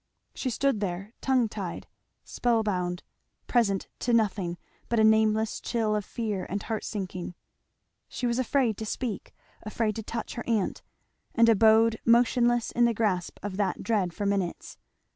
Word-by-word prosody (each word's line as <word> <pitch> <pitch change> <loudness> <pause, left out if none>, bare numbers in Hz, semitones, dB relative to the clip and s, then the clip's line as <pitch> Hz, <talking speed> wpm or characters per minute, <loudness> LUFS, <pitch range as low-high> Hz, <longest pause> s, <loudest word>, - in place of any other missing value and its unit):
She 260 - -3
stood 270 -1 +1
there 195 +2 -4
tongue 255 -3 +2
tied, 195 -5 -6 0.4
spell 235 -2 +1
bound, 180 -3 -2 0.4
present 200 -6 +1
to 240 - 0
nothing 200 -6 +1 0.3
but 235 - +2
a - - +5
nameless 220 0 +3
chill 225 -3 0
of 210 - -1
fear 210 -3 -3
and 200 +2 -3
heart 220 -2 -3
sinking. 185 -4 -5 0.7
She 250 - -4
was 240 +1 +1
afraid 255 -4 +1
to 220 - -5
speak 230 -2 -4 0.3
afraid 215 0 -1
to - - -3
touch 225 +2 -5
her 240 - -5
aunt, 215 -5 0 0.5
and 230 0 +5
abode 225 0 +5
motionless 240 0 +3
in 240 - +3
the 235 -1 +1
grasp 200 -5 -1
of 200 -2 -4
that 195 -3 -1
dread 205 -6 +1
for 205 +4 -4
minutes. 195 -3 -2
220 Hz, 160 wpm, -27 LUFS, 200-235 Hz, 0.7 s, a